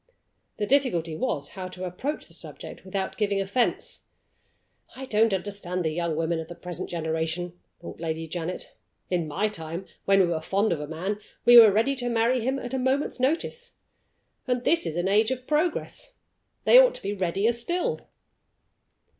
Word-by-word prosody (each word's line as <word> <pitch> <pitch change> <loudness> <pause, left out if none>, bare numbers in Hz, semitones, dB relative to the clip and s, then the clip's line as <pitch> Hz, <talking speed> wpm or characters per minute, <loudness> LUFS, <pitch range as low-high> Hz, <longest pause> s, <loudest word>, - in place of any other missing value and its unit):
The 210 - -1
difficulty 205 - +1
was, 150 - -2
how 185 -2 -6
to 185 0 -7
approach 255 - -4
the - - -12
subject - - -9
without 190 0 -3
giving 205 -2 +1
offense. 200 +5 -1 0.9
"I 265 - -6
don't 225 -2 +3
understand 185 -2 -2
the 160 - +1
young 170 0 -1
women 165 +1 0
of 160 - -6
the 175 - -9
present 175 +1 -6
generation," 165 +1 -2 0.2
thought 170 - -9
Lady 165 0 -3
Janet. 175 +2 -5 0.4
"In 175 -3 0
my 195 +8 0
time, 170 -2 -6 0.2
when 195 0 +5
we 190 - +6
were 170 -2 -1
fond 200 +4 +1
of 160 - -4
a 150 - -5
man, 185 +7 -3 0.3
we 240 - +8
were 220 -3 +9
ready 230 +7 +2
to 245 -1 -2
marry 235 +2 +2
him 260 +4 0
at 250 -1 -6
a 265 - 0
moment's 260 +2 0
notice. 330 - -1 0.7
And 250 -1 0
this 335 +4 +2
is 155 - -3
an 175 +2 0
age 215 +3 +3
of 255 -1 -3
progress! 345 - -1 0.5
They - - +8
ought - - +5
to - - -7
be 200 - -2
readier 195 +3 +1
still." 345 +10 -1
195 Hz, 180 wpm, -26 LUFS, 170-250 Hz, 0.9 s, were